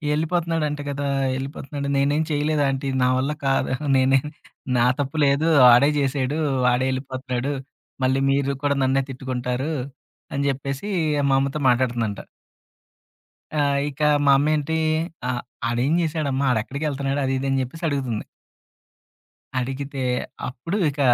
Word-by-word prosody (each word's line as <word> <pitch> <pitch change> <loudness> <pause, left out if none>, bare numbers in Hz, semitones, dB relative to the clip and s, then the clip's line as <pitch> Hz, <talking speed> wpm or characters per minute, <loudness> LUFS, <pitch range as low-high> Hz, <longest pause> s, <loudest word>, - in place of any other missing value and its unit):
"ఎళ్ళిపోతున్నాడు 165 0 0
అంట 145 0 -4
కదా! 140 0 -2 0.3
ఎళ్ళిపోతున్నాడు. 140 +1 -5
నేనేం 145 +3 +2
చేయలేదు 150 0 +1
ఆంటీ. 135 0 -2
నా 125 - +4
వల్ల 135 +3 0
కాదు 135 -1 +1 0.3
నే‌నేం 135 +1 +3 0.5
నా 120 - +4 0.2
తప్పు 140 +3 -4
లేదు, 140 +3 +2 0.3
ఆడే 140 +4 +6
చేశాడు, 140 +1 0 0.3
వాడే 125 +1 +3
ఏళ్ళిపోతున్నాడు 130 0 -3 0.5
మళ్ళీ 130 +1 +2
మీరు 140 0 +1
కూడా 140 -1 +1
నన్నే 135 +1 +2
తిట్టుకుంటారు" 130 +3 -3 0.6
అని 140 0 -1
చెప్పేసి, 140 +6 -3 0.4
మా 135 - +4
అమ్మతో 140 +2 -2
మాటాడుతుందంట. 120 -4 0 1.4
ఆ! - - +1 0.3
ఇక 145 +1 -10 0.2
మా 140 - +6
అమ్మేంటీ? 155 +2 +1 0.5
ఆహ్, 125 -1 -1 0.3
"ఆడేం 120 +6 +1
చేసాడమ్మా, 150 -4 -1
ఆడెక్కడికెళ్తున్నాడు?" 140 +4 -1
అది, 135 - 0
ఇది 135 - -2
అని 135 0 +1
చెప్పేసడుగుతుంది. 135 -5 -3 1.4
అడిగితే, 135 +2 -4 0.5
అప్పుడు 165 - -4
ఇక 145 0 -8
140 Hz, 120 wpm, -23 LUFS, 130-145 Hz, 1.4 s, ఆడే